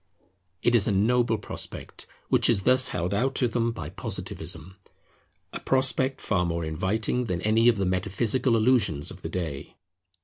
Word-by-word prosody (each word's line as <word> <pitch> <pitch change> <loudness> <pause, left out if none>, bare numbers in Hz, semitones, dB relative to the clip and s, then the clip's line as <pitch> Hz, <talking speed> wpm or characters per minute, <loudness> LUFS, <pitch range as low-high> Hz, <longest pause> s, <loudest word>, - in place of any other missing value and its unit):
It 120 - +3
is 115 -4 +5
a - - +2
noble 115 +3 +2
prospect 105 - -6 0.2
which - - +4
is 100 -5 +3
thus 130 +2 +4
held 90 -2 -2
out 130 +6 0
to 125 - +2
them 115 0 0
by 80 -10 -6
Positivism, 90 - -5 0.8
a - - -4
prospect 130 0 +1
far 95 -4 0
more 85 -1 -2
inviting 105 +10 -1
than 90 -5 -2
any 110 +2 +3
of 120 -3 +5
the 100 - 0
metaphysical 105 +7 0
illusions 110 - +1
of - - -12
the - - -5
day. 80 -7 -5
110 Hz, 165 wpm, -26 LUFS, 90-120 Hz, 0.8 s, is